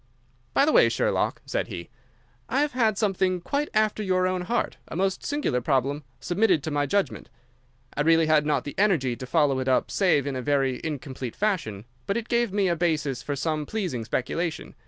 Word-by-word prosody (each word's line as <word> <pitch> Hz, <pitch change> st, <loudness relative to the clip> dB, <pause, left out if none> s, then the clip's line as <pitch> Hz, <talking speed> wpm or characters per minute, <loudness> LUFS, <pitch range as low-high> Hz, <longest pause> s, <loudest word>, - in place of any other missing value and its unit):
"By 275 Hz, -, +5 dB
the 310 Hz, -, +3 dB
way, -, -, +6 dB
Sherlock," -, -, 0 dB
said -, -, -2 dB
he, -, -, -7 dB, 0.6 s
"I 275 Hz, -, +2 dB
have 295 Hz, 0 st, +1 dB
had 225 Hz, -5 st, +1 dB
something 190 Hz, -3 st, +1 dB
quite 285 Hz, +11 st, -2 dB
after 215 Hz, 0 st, +1 dB
your 185 Hz, -2 st, +1 dB
own 185 Hz, 0 st, 0 dB
heart—a 235 Hz, -1 st, -3 dB
most 190 Hz, +2 st, 0 dB
singular 290 Hz, -, -1 dB
problem—submitted 145 Hz, -, 0 dB
to 160 Hz, -, -3 dB
my 145 Hz, 0 st, 0 dB
judgment. 200 Hz, +7 st, -1 dB, 0.7 s
I -, -, 0 dB
really 165 Hz, +1 st, +4 dB
had 155 Hz, -1 st, +4 dB
not 150 Hz, 0 st, 0 dB
the 145 Hz, -, -6 dB
energy 160 Hz, -, +2 dB
to 130 Hz, +1 st, -8 dB
follow 145 Hz, -2 st, +2 dB
it 130 Hz, -, -3 dB
up 130 Hz, -, +2 dB
save 175 Hz, -8 st, +2 dB
in 140 Hz, -2 st, -3 dB
a 130 Hz, -, -2 dB
very 135 Hz, -1 st, 0 dB
incomplete 135 Hz, -5 st, -5 dB
fashion, 165 Hz, -, -1 dB, 0.2 s
but 200 Hz, -, 0 dB
it 235 Hz, 0 st, -5 dB
gave 235 Hz, -3 st, +1 dB
me 200 Hz, -1 st, +1 dB
a 170 Hz, -, +2 dB
basis 155 Hz, -6 st, 0 dB
for 145 Hz, -, -3 dB
some 150 Hz, +1 st, -2 dB
pleasing 180 Hz, -, -3 dB
speculation. 160 Hz, +8 st, -3 dB
165 Hz, 190 wpm, -26 LUFS, 140-200 Hz, 0.7 s, way